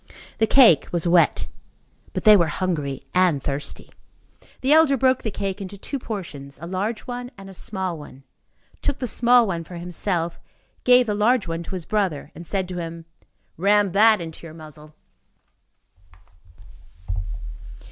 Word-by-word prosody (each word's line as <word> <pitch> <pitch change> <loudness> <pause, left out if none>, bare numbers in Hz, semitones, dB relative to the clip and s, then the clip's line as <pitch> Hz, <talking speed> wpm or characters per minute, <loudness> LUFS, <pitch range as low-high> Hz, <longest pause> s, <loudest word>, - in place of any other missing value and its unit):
The 220 - +3
cake 225 - +6
was 175 -1 -2
wet; 170 0 +3 0.7
but - - -3
they 215 -1 +8
were 170 -4 +3
hungry 150 -6 -2
and 180 -5 +3
thirsty. 140 +1 -4 0.7
The 270 +3 +3
elder 310 -3 +5
broke 260 +1 +2
the 220 - -2
cake 195 0 -4
into 200 +1 -7
two 275 +7 -5
portions, 160 - -7
a 165 - -7
large 200 +5 -3
one 245 0 -6
and 195 0 -10
a - - -12
small 185 -3 -4
one, 135 -2 -13 0.6
took 285 -1 -1
the 260 - -3
small 240 0 +4
one 170 -5 -3
for 175 - -11
himself, 170 0 -2 0.5
gave 250 0 +6
the 210 - -1
large 215 +1 +2
one 165 0 -3
to 180 +3 -6
his 175 -3 -6
brother, 185 -9 -1
and 170 +1 -11
said 190 -2 -1
to 180 -1 -4
him: 165 -1 -7 0.5
"Ram 200 +2 +3
that 215 +2 +5
into 165 0 -8
your 155 - -12
muzzle." 155 -1 -13
185 Hz, 155 wpm, -23 LUFS, 165-220 Hz, 0.7 s, they